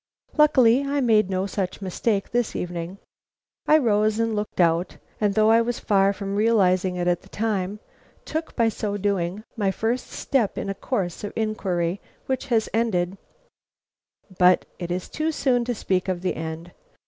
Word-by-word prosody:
Luckily 265 -4 +5
I 280 +1 -1
made 220 -6 +3
no 190 0 0
such 195 -2 -3
mistake 195 +2 -1
this 240 -1 0
evening. 175 +1 -4 0.7
I 310 - +7
rose 215 -5 +2
and 225 -1 0
looked 210 -2 -4
out, 170 +1 +2 0.2
and 205 -2 +1
though 215 0 +5
I 230 +1 +6
was 235 +1 -2
far 195 -1 +3
from 200 0 -4
realizing 190 -4 +2
it 175 0 -1
at 175 -1 +1
the - - -19
time, 205 -2 -2 0.5
took, 315 +1 -4
by 230 -2 +3
so 210 -2 -2
doing, 200 0 -1
my 205 -4 +1
first 225 +5 -1
step 250 -8 -1
in 195 - -2
a - - -2
course 195 -4 -3
of 205 - -5
inquiry 190 -5 -1 0.2
which 265 +1 -2
has 230 -4 +2
ended 195 -5 0 1.2
But 180 0 +5
it 175 -1 -5
is 180 +1 -3
too 315 +1 -2
soon 255 -5 +1
to 245 0 -2
speak 185 -3 -1
of 185 -1 -2
the 185 - 0
end. 160 +2 -6
205 Hz, 170 wpm, -24 LUFS, 185-230 Hz, 1.2 s, I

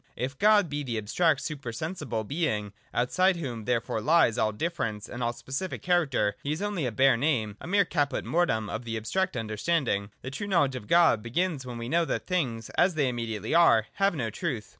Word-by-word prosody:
If 135 +2 -4
God 210 -3 +5
be 145 -1 -3
the 120 -5 -3
abstract 155 +11 +1
super 140 -6 -5
sensible 120 -4 -4
Being, 105 - -2 0.2
outside 185 +10 +2
whom 125 -10 -5
therefore 115 -2 -1
lies 155 -4 +4
all 110 - +1
difference 110 - -3
and 120 - -7
all 120 0 +1
specific 135 +10 -5
character, 145 - +1
He 145 - -3
is 155 - -2
only 200 -9 -1
a - - -2
bare 130 +2 +4
name, 115 -7 0
a - - -7
mere 200 +2 +3
caput 145 -4 -1
mortuum 155 -11 +1
of 115 +4 -5
abstracting 115 - -1
understanding. 110 -1 -1
The 130 - -5
true 205 +9 -5
knowledge 155 -9 +2
of 105 -5 -7
God 170 -10 +5
begins 140 +3 -2
when 120 -1 -6
we 115 0 -5
know 165 +5 +2
that - - -3
things, 125 - -2
as 180 -1 +4
they 145 -4 +2
im 120 - -4
mediately 110 -2 -3
are, 140 -10 +5
have 195 -2 +1
no 115 -6 -2
truth. 120 - -4
130 Hz, 205 wpm, -28 LUFS, 115-170 Hz, 0.2 s, God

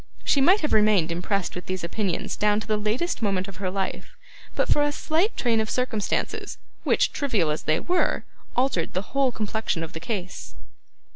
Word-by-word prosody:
She 280 - +3
might 370 +9 +5
have 300 - 0
remained 210 -6 +4
impressed 180 +2 -1
with 180 -1 -7
these 185 -1 -3
opinions 185 +1 -2
down 210 0 +2
to 215 - -6
the 215 -1 +1
latest 215 +12 -1
moment 195 -3 0
of 195 -2 -9
her 185 -1 -2
life, 190 0 -4 0.4
but - - +1
for 295 - +3
a 290 0 +2
slight 325 +8 0
train 230 -3 +2
of 220 - -3
circumstances, 245 -5 -1 0.3
which, - - +3
trivial 215 - +1
as 150 - -2
they 155 +1 +1
were, 360 0 +1 0.3
altered 250 -10 +1
the 185 +6 -4
whole 275 -2 +3
complexion 215 -6 -2
of 160 - -7
the 160 - -5
case. 185 -2 -5
210 Hz, 190 wpm, -25 LUFS, 185-250 Hz, 0.4 s, might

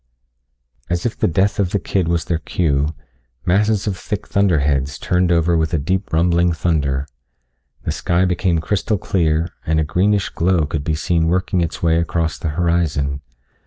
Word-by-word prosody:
As 85 0 -1
if 120 - -1
the - - +1
death 95 +5 +1
of 95 -3 +2
the 100 - 0
kid 95 -2 -1
was 85 -1 0
their 85 -2 -1
cue, 75 -3 0 0.5
masses 105 +3 +2
of 100 -3 -1
thick 105 +3 -5
thunderheads 75 -8 +1
turned 90 0 +1
over 85 0 +3
with 80 +1 +1
a - - +2
deep 90 +7 -2
rumbling 85 +1 +2
thunder. 70 -5 0 0.8
The - - -1
sky 90 +2 +1
became 90 -1 +1
crystal 105 +4 0
clear, 80 -3 0 0.2
and 80 0 +1
a - - +2
greenish 100 +6 +1
glow 85 -2 +1
could 75 -1 -3
be 80 +1 -1
seen 80 +1 +1
working 90 +1 +1
its 85 0 -3
way 80 -1 +3
across 85 -1 -1
the 80 - -2
horizon. 75 -5 0
85 Hz, 170 wpm, -19 LUFS, 80-90 Hz, 0.8 s, over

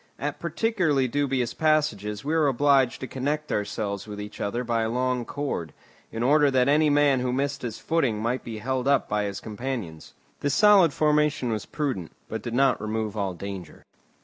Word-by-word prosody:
At 145 +1 -4
particularly 170 - +1
dubious 135 -2 0
passages 150 -9 0
we 155 - 0
were 160 -2 +3
obliged 135 -1 +3
to 130 - -4
connect 145 +4 -3
ourselves 105 -1 -2
with 105 -1 -7
each 105 0 -8
other 120 +5 -2
by 115 -1 0
a 110 - 0
long 125 0 0
cord, 135 - -4 0.4
in 115 +1 -3
order 145 +2 +4
that 130 -1 +2
any 150 +2 +4
man 145 -2 +4
who 125 0 -1
missed 140 +2 -1
his 115 -3 -5
footing 135 -10 0
might 120 +4 -1
be 115 -2 -6
held 130 +3 -2
up 140 -2 +3
by 105 0 0
his 100 -1 -4
companions. 110 -8 -6 0.2
This 145 -1 0
solid 205 -6 +6
formation 150 -4 +1
was 110 -2 -3
prudent, 130 - -3
but - - -5
did 120 0 -4
not 135 -2 +3
remove 110 -1 -3
all 100 -3 -2
danger. 95 -2 -8
130 Hz, 185 wpm, -26 LUFS, 110-145 Hz, 0.4 s, solid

